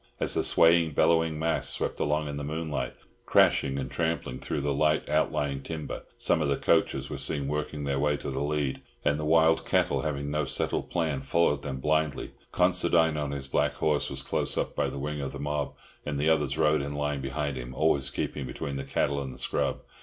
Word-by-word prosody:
As - - +2
the - - +2
swaying, 85 -1 +4
bellowing 80 +1 +3
mass 80 +1 0
swept - - 0
along 75 +1 0
in 70 0 -4
the 70 - -4
moonlight, 80 +1 -3 0.3
crashing 70 0 +4
and 65 -1 -4
trampling 80 -5 -2
through - - -3
the 70 0 0
light 75 +2 +2
outlying 70 -2 0
timber, 80 +1 -5 0.2
some - - +1
of 75 - +1
the 70 - +1
coachers - - +1
were - - -4
seen 70 -1 -2
working 75 0 -3
their 70 -1 -1
way 75 0 +2
to - - -5
the 65 +1 -3
lead, 75 -2 -1 0.2
and 75 - +2
the 75 - -2
wild 80 +1 +4
cattle - - +1
having 70 -2 -3
no 75 +1 0
settled 65 - -1
plan, 80 -5 -1
followed 75 0 +2
them 70 -2 -4
blindly. 75 0 0 0.2
Considine, 85 -3 +3
on 75 -1 -2
his 70 -1 -4
black 75 +1 +1
horse, 75 -2 +1
was 70 0 -5
close - - +1
up - - -1
by - - 0
the - - -7
wing 75 +1 -3
of 70 -1 -4
the 70 - -7
mob, 75 0 -2 0.3
and 75 -1 -3
the 75 +3 +2
others 75 -4 +1
rode 75 -1 +3
in 70 +1 -4
line 75 -1 -1
behind 70 +1 -2
him, 65 0 -7
always 70 -2 +2
keeping 70 0 -3
between 70 +3 -4
the 70 - -4
cattle 70 +1 0
and 65 -1 -5
the - - -11
scrub. - - -1
75 Hz, 215 wpm, -28 LUFS, 70-80 Hz, 0.3 s, swaying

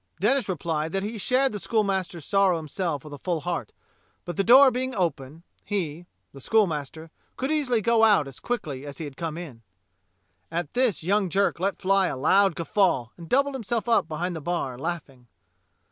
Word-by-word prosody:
Denis 240 +5 +2
replied 160 -2 -2
that 195 0 -1
he 215 +2 -4
shared 260 +5 +2
the 210 - -5
schoolmaster's 190 - -1
sorrow 195 -3 +3
himself 160 -1 -3
with 150 -1 -10
a 145 - -8
full 170 -1 -2
heart, 170 - -3 0.5
but 175 - -5
the 195 - +1
door 260 +5 +8
being 255 +1 -3
open, 160 -4 -3 0.2
he 175 -4 -3
— - - -49
the 135 - -11
schoolmaster 160 -5 0
— - - -41
could 265 +3 -2
easily 260 -7 +1
go 230 +1 +3
out 205 -10 +5
as 135 - -10
quickly 155 - -4
as 145 -1 -8
he 165 - -5
had 145 -2 -9
come 165 0 -4
in. 145 -10 -9 0.9
At 165 -2 -4
this 245 -9 +1
young 195 +2 +1
Jerk 195 0 +1
let 195 +2 -1
fly 195 0 +2
a - - -3
loud 190 +6 +3
guffaw 170 - +1
and 170 -2 -12
doubled 275 +2 +2
himself 235 -4 -2
up 230 -8 +3
behind 170 +3 -3
the 160 - -5
bar, 145 -5 -2
laughing. 135 -4 -6
180 Hz, 190 wpm, -25 LUFS, 155-215 Hz, 0.9 s, door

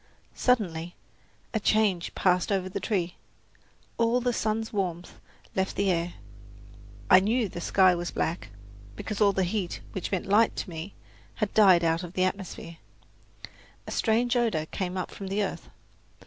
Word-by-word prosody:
Suddenly 175 -9 0 0.6
a 220 - +1
change 205 -5 +1
passed 180 +1 +2
over 190 -2 0
the 195 +2 -4
tree. 180 -3 -2 0.8
All 230 +1 +3
the 245 0 0
sun's 220 0 -1
warmth 180 -4 -3 0.4
left 190 0 0
the 200 -1 +2
air. 170 0 -1 0.9
I 185 - +8
knew 220 +4 +1
the 175 -2 -7
sky 185 +1 +4
was 175 0 -3
black, 160 -10 -2 0.5
because 210 - -5
all 205 -1 +6
the 190 -1 0
heat, 185 0 -2
which 185 - -4
meant 190 - -1
light 210 +3 +3
to - - -4
me, 165 +4 -7 0.4
had 215 -2 -2
died 190 -5 +6
out 165 0 +2
of 175 -1 -8
the 185 - +1
atmosphere. 185 -3 -4 1.1
A - - -7
strange 235 +2 +1
odour 225 -11 +1
came 185 +2 -4
up 185 - -3
from 195 - -7
the 200 +2 0
earth. 195 - -5
190 Hz, 160 wpm, -27 LUFS, 175-215 Hz, 1.1 s, I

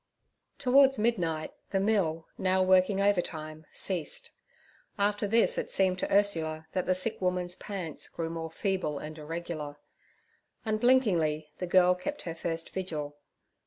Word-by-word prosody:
Towards 270 0 +5
midnight 175 -9 0 0.2
the 195 - +1
mill, 190 -6 +1
now 185 0 +2
working 185 +1 +4
overtime, 160 -6 -1
ceased. 175 -6 -2 0.7
After 205 +1 +1
this 235 - +3
it - - -4
seemed 185 -1 +2
to - - -2
Ursula 165 -6 +1
that 185 - -2
the 185 - +3
sick 195 +4 0
woman's 180 -1 0
pants 180 -7 -5
grew 165 -1 -4
more 165 -1 -4
feeble 185 -4 -1
and 155 +2 -7
irregular. 155 -2 -5 0.9
Unblinkingly 210 - +2
the 180 - -3
girl 180 0 +5
kept 235 +12 -5
her 165 - -4
first 165 0 -3
vigil. 150 -6 -4
180 Hz, 135 wpm, -29 LUFS, 160-200 Hz, 0.9 s, Towards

